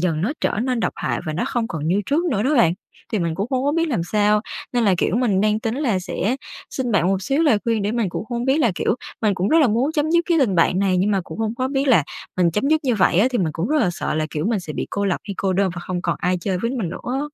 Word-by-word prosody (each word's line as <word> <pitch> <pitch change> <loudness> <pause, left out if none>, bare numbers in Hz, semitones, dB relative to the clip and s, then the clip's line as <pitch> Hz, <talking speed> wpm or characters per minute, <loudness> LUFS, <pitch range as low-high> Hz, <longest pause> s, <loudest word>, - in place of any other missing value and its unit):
dần 165 -3 0
nó 230 +10 0
trở - - 0
nên 250 -2 -1
độc - - 0
hại - - -2
và 155 - -2
nó 170 - -1
không 235 -2 -1
còn 155 -2 -4
như 190 +4 +2
trước 305 +5 +1
nữa 230 - 0
đó 280 +5 +1
bạn. 230 - +4 0.4
Thì 215 - +1
mình 170 -3 -1
cũng 200 +5 -2
không 260 0 0
có 285 - +2
biết 330 +1 +1
làm 235 - 0
sao, 210 0 +3 0.3
nên 240 -2 +1
là, 195 -3 +4
kiểu, 200 - +1
mình 225 -6 +2
đang 215 +1 +1
tính 225 0 -2
là 255 -8 0
sẽ 195 +6 -2 0.3
xin 250 -4 -2
bạn 175 -4 +3
một 195 0 0
xíu 275 +10 +1
lời 240 -10 +4
khuyên 230 -3 0
để 205 +2 -1
mình 230 -5 0
cũng 190 - -5
hông 240 0 -2
biết 265 +3 +2
là 235 -9 +3
kiểu, 195 - 0 0.3
mình 210 -2 +2
cũng 185 +2 -1
rất 325 - +4
là 280 - +4
muốn 245 +8 +1
chấm 305 +1 0
dứt 340 0 +3
cái 340 -2 +2
tình 240 -10 +2
bạn 180 +2 +3
này, 195 -2 +2
nhưng 195 +4 +2
mà 195 - +2
cũng - - -9
hông 220 0 -1
có 255 +2 -1
biết 275 0 0
là 185 - +5 0.3
mình 175 -2 +3
chấm 210 - 0
dứt 315 0 +3
như 250 -3 +2
vậy 190 -3 +3
á 215 - +5
thì 245 - 0
mình 165 -4 0
cũng 170 +7 -2
rất 305 - +2
là 215 - +2
sợ - - -3
là, 155 0 0
kiểu, 155 +1 -3
mình 225 -4 0
sẽ 155 -4 -7
bị - - -3
cô 200 - -1
lập 190 -3 0
hay 200 - -3
cô 190 -1 0
đơn 190 0 +1
và 175 - -6
không 180 0 -4
còn - - -1
ai 180 0 0
chơi 185 +1 -1
với 230 +5 -1
mình 235 -9 -2
nữa - - -6
á. 260 +2 -1
215 Hz, 320 wpm, -21 LUFS, 185-255 Hz, 0.4 s, là